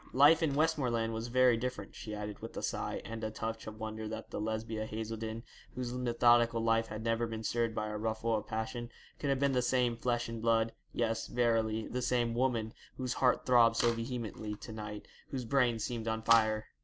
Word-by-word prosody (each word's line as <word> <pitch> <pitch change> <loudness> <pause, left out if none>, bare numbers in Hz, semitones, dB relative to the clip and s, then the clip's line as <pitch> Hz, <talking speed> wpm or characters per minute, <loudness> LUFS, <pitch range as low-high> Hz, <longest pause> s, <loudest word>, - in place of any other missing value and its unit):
Life 145 +5 +7
in 150 -4 +1
Westmoreland 130 -8 +1
was 115 +1 -3
very 125 -1 +4
different,' 125 +2 -4
she 105 -1 -6
added, 105 -1 -5
with - - -8
a - - -4
sigh, - - -2
and 115 0 -6
a 110 - -1
touch 110 +1 -5
of 110 0 -8
wonder 110 0 -4
that 110 +1 -6
the - - -3
Lesbia 110 0 -2
Haselden, 110 +1 -4 0.3
whose 125 -1 -3
methodical 120 -1 +3
life 115 0 +2
had 110 0 -6
never 115 0 +1
been 110 0 -5
stirred 115 0 0
by 110 - -1
a 105 - -3
ruffle 110 +1 0
of 105 - -3
passion, 115 +2 -3 0.3
could 145 - -1
have 135 - +3
been 140 +1 +2
the 125 -1 +2
same 125 -1 +2
flesh 120 0 -1
and 115 -1 -5
blood 115 0 +3 0.2
yes, 115 -1 -1
verily, 115 -2 +1
the 125 - -3
same 120 -2 +1
woman, 120 -3 0 0.2
whose 125 -2 -2
heart 125 -2 +3
throbbed 120 -2 +6
so 120 0 +3
vehemently 115 -3 -4
to 110 - -10
night, 105 -1 -7 0.2
whose 130 -3 -4
brain 125 -2 +3
seemed 115 +1 -3
on 110 0 -1
fire. 110 -1 +4
115 Hz, 205 wpm, -33 LUFS, 110-120 Hz, 0.3 s, Life